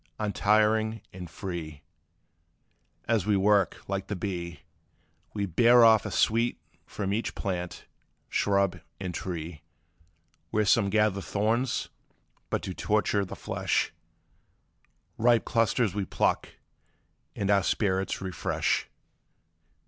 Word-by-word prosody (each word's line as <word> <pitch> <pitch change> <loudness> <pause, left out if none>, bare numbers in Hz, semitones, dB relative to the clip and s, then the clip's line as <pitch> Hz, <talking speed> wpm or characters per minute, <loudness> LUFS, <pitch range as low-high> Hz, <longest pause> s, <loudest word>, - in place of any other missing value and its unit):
Untiring 110 +1 +2
and 90 -2 -8
free, 85 -5 -6 1.2
As 110 -4 +1
we 105 -2 +3
work, 100 +1 +2
like 95 0 -3
the 105 - -3
bee, 85 -5 -5 0.7
We 100 -1 0
bear 120 +6 +6
off 110 -2 +5
a - - -4
sweet 115 +2 +1 0.3
from 100 -1 -3
each 115 +3 -2
plant, 90 -3 -4 0.4
shrub, 100 -2 +1 0.2
and 90 -2 -4
tree: 85 -3 -5 0.9
Where 110 0 +1
some 100 0 +3
gather 105 -1 +2
thorns 115 +6 0 0.6
but - - -1
to 95 - -4
torture 105 0 +1
the - - -8
flesh, - - -1 1.3
Ripe 120 0 +4
clusters 115 -2 +1
we 100 -1 -2
pluck, - - 0 0.9
and 100 0 0
our 100 -1 +4
spirits 95 0 0
refresh. 95 -2 -1
100 Hz, 110 wpm, -28 LUFS, 95-110 Hz, 1.3 s, bear